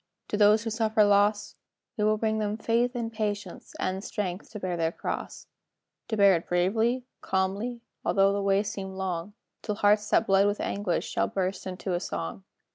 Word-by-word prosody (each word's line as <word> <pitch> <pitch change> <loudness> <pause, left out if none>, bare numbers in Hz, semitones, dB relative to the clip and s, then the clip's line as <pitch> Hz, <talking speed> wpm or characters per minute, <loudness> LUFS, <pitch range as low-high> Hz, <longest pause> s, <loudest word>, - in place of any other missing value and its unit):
To - - -1
those 210 +1 +5
who 225 - -3
suffer 220 -1 +3
loss? 205 0 +2 0.4
"We 210 - -1
will 215 0 +3
bring 220 0 0
them 210 0 -1
faith, 235 +3 +1
and 230 -1 -3
patience, 205 -4 -4
And 190 +1 -2
strength 190 -3 -4
to 215 - -7
bear 185 -2 -2
their 165 -1 0
cross, - - -5 0.6
To 220 - -2
bear 200 -1 +7
it 165 - -4
bravely, 220 +8 +1 0.2
calmly, 200 +6 -1 0.2
Although 195 0 +3
the 200 - -1
way 195 0 +2
seem 200 -2 -5
long, 190 0 -3 0.3
Till 210 - -3
hearts 210 0 +3
that 225 - +3
bled 195 0 +4
with 205 +1 -1
anguish 200 -3 -1
Shall - - 0
burst 190 0 -2
into 185 0 -4
a 175 - +1
song. 85 - -5
205 Hz, 185 wpm, -27 LUFS, 190-215 Hz, 0.6 s, bear